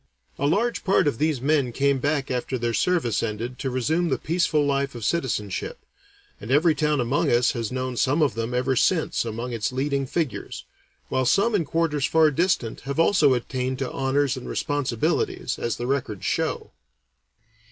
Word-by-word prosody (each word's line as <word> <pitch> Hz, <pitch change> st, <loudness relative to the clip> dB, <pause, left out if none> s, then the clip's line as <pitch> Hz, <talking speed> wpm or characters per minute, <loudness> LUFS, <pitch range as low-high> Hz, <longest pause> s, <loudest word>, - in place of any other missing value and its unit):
A 140 Hz, -, +1 dB
large 230 Hz, +10 st, 0 dB
part 190 Hz, -5 st, +3 dB
of 130 Hz, -6 st, -1 dB
these 155 Hz, -3 st, +1 dB
men 140 Hz, -3 st, +1 dB
came 140 Hz, +2 st, +1 dB
back 145 Hz, 0 st, -1 dB
after 130 Hz, +1 st, -2 dB
their 120 Hz, -1 st, -1 dB
service 135 Hz, -, +1 dB
ended 115 Hz, +3 st, -4 dB
to 135 Hz, -, -2 dB
resume 155 Hz, +7 st, 0 dB
the -, -, +1 dB
peaceful 160 Hz, -3 st, +1 dB
life 140 Hz, -1 st, 0 dB
of 115 Hz, -3 st, -5 dB
citizenship, 110 Hz, -, -2 dB, 0.5 s
and 105 Hz, -, -9 dB
every 155 Hz, +5 st, +4 dB
town 150 Hz, -2 st, +1 dB
among 125 Hz, +3 st, +1 dB
us 120 Hz, +1 st, +3 dB
has 115 Hz, -3 st, -4 dB
known 130 Hz, 0 st, -3 dB
some 145 Hz, +6 st, +2 dB
of 140 Hz, -, +1 dB
them 115 Hz, +1 st, -3 dB
ever 125 Hz, +2 st, 0 dB
since 160 Hz, -1 st, +1 dB
among 115 Hz, +2 st, -4 dB
its 115 Hz, 0 st, -2 dB
leading 135 Hz, +1 st, -1 dB
figures, 130 Hz, -, -3 dB, 0.4 s
while 130 Hz, -, +1 dB
some 215 Hz, -, +3 dB
in 185 Hz, -6 st, +1 dB
quarters 150 Hz, -2 st, 0 dB
far 160 Hz, -1 st, +4 dB
distant 150 Hz, -7 st, 0 dB
have 140 Hz, +3 st, -4 dB
also 160 Hz, -6 st, +4 dB
attained 130 Hz, +1 st, -3 dB
to 135 Hz, -1 st, -3 dB
honors 135 Hz, 0 st, 0 dB
and 130 Hz, -, -7 dB
responsibilities, 145 Hz, -6 st, -1 dB
as 120 Hz, -, -2 dB
the 120 Hz, -, -4 dB
records 120 Hz, -7 st, -2 dB
show. -, -, -1 dB
135 Hz, 175 wpm, -24 LUFS, 125-155 Hz, 0.5 s, every